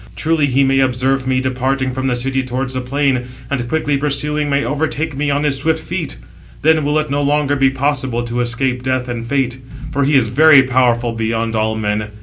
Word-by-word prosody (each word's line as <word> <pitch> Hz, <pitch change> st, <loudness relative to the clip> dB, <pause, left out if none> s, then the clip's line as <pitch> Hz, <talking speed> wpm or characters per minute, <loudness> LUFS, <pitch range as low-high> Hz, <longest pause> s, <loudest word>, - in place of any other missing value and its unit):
Truly 160 Hz, -2 st, +1 dB
he 135 Hz, +1 st, +2 dB
may 135 Hz, 0 st, +2 dB
observe 130 Hz, +1 st, +1 dB
me 130 Hz, 0 st, +1 dB
departing 130 Hz, 0 st, -1 dB
from 130 Hz, +1 st, -2 dB
the 125 Hz, -, +1 dB
city 135 Hz, +2 st, -1 dB
towards 130 Hz, +1 st, -3 dB
the 130 Hz, -, -2 dB
plain, 135 Hz, -1 st, 0 dB, 0.3 s
and, 120 Hz, -4 st, -2 dB
quickly 150 Hz, -1 st, 0 dB
pursuing, 150 Hz, +1 st, 0 dB
may 140 Hz, 0 st, +1 dB
overtake 155 Hz, 0 st, -2 dB
me 145 Hz, +1 st, -1 dB
on 140 Hz, +1 st, 0 dB
his 145 Hz, -2 st, +1 dB
swift 160 Hz, +3 st, 0 dB
feet; -, -, -5 dB, 0.5 s
then 160 Hz, 0 st, +4 dB
will 145 Hz, +2 st, +1 dB
it 155 Hz, -2 st, -1 dB
no 145 Hz, +1 st, 0 dB
longer 145 Hz, 0 st, +1 dB
be 135 Hz, -1 st, +3 dB
possible 130 Hz, -3 st, -1 dB
to 120 Hz, +1 st, -2 dB
escape 125 Hz, +1 st, -1 dB
Death 130 Hz, -1 st, -1 dB
and 115 Hz, -1 st, -5 dB
Fate; 130 Hz, -1 st, -1 dB, 0.3 s
for 140 Hz, -, 0 dB
he 145 Hz, +2 st, +2 dB
is 120 Hz, -5 st, +3 dB
very 140 Hz, +2 st, +6 dB
powerful 125 Hz, -2 st, +1 dB
beyond 115 Hz, 0 st, -2 dB
all 110 Hz, 0 st, 0 dB
men. 105 Hz, -1 st, -2 dB
135 Hz, 205 wpm, -17 LUFS, 125-145 Hz, 0.5 s, very